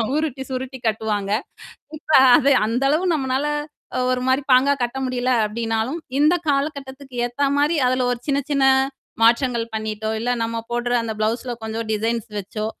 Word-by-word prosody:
உருட்டி, 290 -4 -2
சுருட்டி 260 0 -4
கட்டுவாங்க. 210 -2 -1 0.7
இப்ப 310 - -8 0.3
அது 280 - +2 0.2
அந்த 240 +4 -1
அளவு 320 +5 +1
நம்மளால 265 -1 -1 0.7
ஒரு 250 0 0
மாரி 260 +2 +2
பாங்கா 265 +3 +5
கட்ட 245 +2 -2
முடியல 255 0 -1 0.2
அப்பிடின்னாலும், 225 +6 -2 0.2
இந்தக் 325 +3 +3
காலகட்டத்துக்கு 275 -2 -3
ஏத்தா 280 +4 -1
மாரி, 295 +3 +2
அதுல 255 0 +1
ஒரு 240 - -3
சின்ன 280 0 +2
சின்ன 275 -1 +3 0.6
மாற்றங்கள் 235 0 +3
பண்ணிட்டோ, 220 0 -3
இல்ல. 240 +2 -2
நாம 230 0 -2
போடுற 240 0 -1
அந்தப் 220 -2 -5
பிளவுஸ்ல 240 +3 -1
கொஞ்சம் 220 0 -4
டிசைன் 225 +2 0 0.2
வச்சோ. 215 +2 -5
250 Hz, 150 wpm, -21 LUFS, 225-275 Hz, 0.7 s, பாங்கா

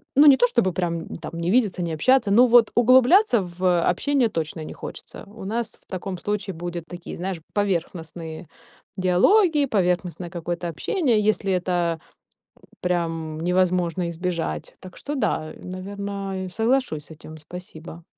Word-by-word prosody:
Ну, 290 +3 +7
не 275 -2 +8
то, 245 - +5
чтобы 235 -6 +1
прям 170 -2 -3
там 165 - -8
не 170 +1 -2
видеться, 210 -6 +2
не 165 -2 -2
общаться, 245 - +3
но 240 +5 +7
вот 240 -2 +5
углубляться 255 - +5
в 180 -1 0
общение 255 +5 +1
точно 160 -2 -4
не - - -7
хочется. - - -9
У 205 0 -11
нас 230 +2 -3
в - - -24
таком 185 0 -5
случае 205 -1 -3
будет 175 0 -5
такие, 175 -1 -8
знаешь, 180 -1 -4
поверхностные 170 -4 -3 0.5
диалоги, 295 - +4
поверхностное 180 -4 -1
какое-то 175 0 -4
общение, 240 - +1
если 195 -2 0
это 175 -2 0 0.8
прям 165 -3 -2
невозможно 180 0 +1
избежать. 170 0 -3
Так 185 -1 -12
что 290 - -5
да, 155 - -1
наверно, 195 +1 -5
я 185 - -5
соглашусь 225 - 0
с - - -15
этим. 155 +1 -12
Спасибо. 165 0 -10
185 Hz, 150 wpm, -23 LUFS, 170-215 Hz, 0.8 s, не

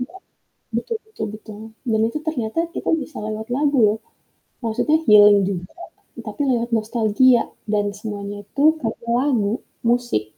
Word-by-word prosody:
Iya. 285 +9 -6 0.6
Betul 440 - -2
betul 435 - -5
betul, 215 -1 -11 0.3
dan 220 - +2
itu 305 - -4
ternyata 245 -3 -2 0.2
kita - - -2
bisa 310 - -11
lewat 215 0 -4
lagu 290 -1 +1
loh, 210 +1 +1 0.7
maksudnya 300 +8 +2
healing 210 -1 +8
juga 180 -2 -4 0.6
tapi - - -5
lewat 235 -1 0
nostalgia 230 +2 +3 0.3
dan 205 -1 +2
semuanya 205 -1 -5
itu 275 +7 -3 0.2
dari 225 +1 -4
lagu, 240 -6 +1 0.4
musik. 240 - +1
225 Hz, 140 wpm, -21 LUFS, 210-255 Hz, 0.7 s, healing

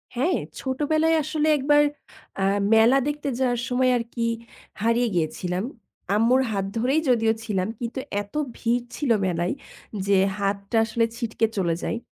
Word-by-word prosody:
হ্যাঁ, 315 +9 +1 0.2
ছোটবেলায় 310 +4 +1
আসলে 310 0 -1
একবার 290 +2 +4 0.6
আ - - +2 0.3
মেলা 230 +4 +6
দেখতে 295 -1 -2
যাওয়ার 245 -2 +1
সময় 255 0 +2
আরকি 230 0 -3 0.6
হারিয়ে 230 +2 +2
গিয়েছিলাম। 180 +3 -1 0.5
আম্মুর 235 +5 +4
হাত 195 -2 -1
ধরেই 265 +7 +2
যদিও 225 -2 +3
ছিলাম 195 -4 -1
কিন্তু 240 +2 -4 0.2
এতো 205 +9 -5 0.2
ভিড় 235 +1 0
ছিল 290 -3 -2 0.2
মেলায় 175 0 0 0.5
যে 200 - +4 0.2
হাতটা 200 +2 -1
আসলে 230 +1 +1
ছিটকে 230 -1 0
চলে 170 -3 +1
যায়। - - -1
235 Hz, 140 wpm, -24 LUFS, 205-265 Hz, 0.6 s, মেলা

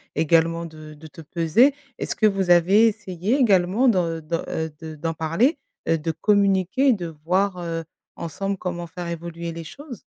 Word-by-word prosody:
également 165 +2 +2
de 155 -1 -11
de 160 +2 -12
te 165 - -13
peser. 170 - +3 0.2
Est-ce - - -3
que 220 - +2
vous 195 -3 0
avez 190 +6 +6
essayé 205 +2 -1
également 205 0 +3
d'en 180 -5 +2 0.2
de, - - -20 0.3
heu, 160 -1 -3
de 160 -1 -7
d'en 165 +2 -3
parler, 180 - +1 0.3
heu, 165 - +3
de 165 +1 -2
communiquer 200 - +2
et - - +6
de 180 -5 -4 0.2
voir, 185 +2 +1
heu, 165 -1 -4 0.3
ensemble 195 +5 -4
comment 175 -2 -4
faire 175 +1 -7
évoluer 170 0 -5
les 165 0 -7
choses? 280 - -10
175 Hz, 180 wpm, -23 LUFS, 165-200 Hz, 0.3 s, avez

